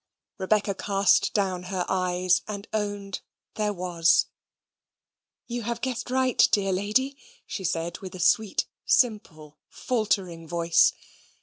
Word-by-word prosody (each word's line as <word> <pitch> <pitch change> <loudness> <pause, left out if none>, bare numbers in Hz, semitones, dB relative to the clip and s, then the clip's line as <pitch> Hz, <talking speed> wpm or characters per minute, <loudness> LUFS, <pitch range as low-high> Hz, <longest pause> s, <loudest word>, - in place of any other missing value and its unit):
Rebecca 200 +1 +1
cast 195 0 +2
down 185 -3 -1
her 185 -2 -1
eyes, 185 -1 +1
and 205 -1 -6
owned 205 -2 -3 0.3
there 210 -1 -1
was. 175 -3 +2 1.2
"You 240 0 -4
have 235 +1 -3
guessed 250 -2 -3
right, 260 -1 0
dear 195 -2 +2
lady," 215 +9 0 0.3
she 195 - -6
said, 170 -1 -2
with 190 -1 -8
a - - -8
sweet 215 +2 +2 0.2
simple 160 - 0
faltering 195 -9 -2
voice. 170 0 +3
195 Hz, 120 wpm, -26 LUFS, 180-215 Hz, 1.2 s, voice